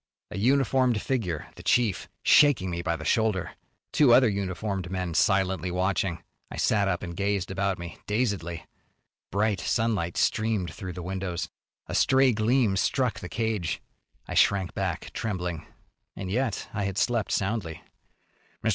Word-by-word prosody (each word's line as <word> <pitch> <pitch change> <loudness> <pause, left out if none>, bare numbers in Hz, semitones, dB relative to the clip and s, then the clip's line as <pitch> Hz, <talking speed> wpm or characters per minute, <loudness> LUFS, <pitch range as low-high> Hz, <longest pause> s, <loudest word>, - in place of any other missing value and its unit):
A 105 - -5
uniformed 130 -1 +3
figure, 95 - -2
the - - -9
chief, 115 -7 +1
shaking 125 -11 +5
me 85 0 -2
by 85 -1 -1
the 80 -1 -7
shoulder. 105 0 +1 0.4
Two 130 -6 +6
other 130 -1 +6
uniformed 100 -2 -2
men 90 -2 -3
silently 95 0 +2
watching. 90 -1 -1 0.3
I - - -8
sat 100 -2 +2
up 90 -2 -1
and 85 -1 -5
gazed 100 -1 -1
about 95 0 0
me, 85 0 -8
dazedly. 100 -7 -1 0.7
Bright 100 0 +1
sunlight 110 -8 0
streamed 110 -6 +1
through 95 -4 -6
the 90 0 -7
windows. 95 -1 -3 0.4
A - - -7
stray 130 -1 +4
gleam 110 -1 +2
struck 125 +4 +1
the 90 - -7
cage. 110 -6 -1 0.5
I - - -5
shrank 95 -3 +3
back, - - -3
trembling. 90 -6 -3 0.5
And 95 -1 -5
yet 125 0 -1
I 105 -2 -1
had 100 -1 -3
slept 120 -2 +1
soundly. 95 -5 -2 0.8
"Mr. 115 - +2
100 Hz, 150 wpm, -27 LUFS, 90-110 Hz, 0.8 s, Two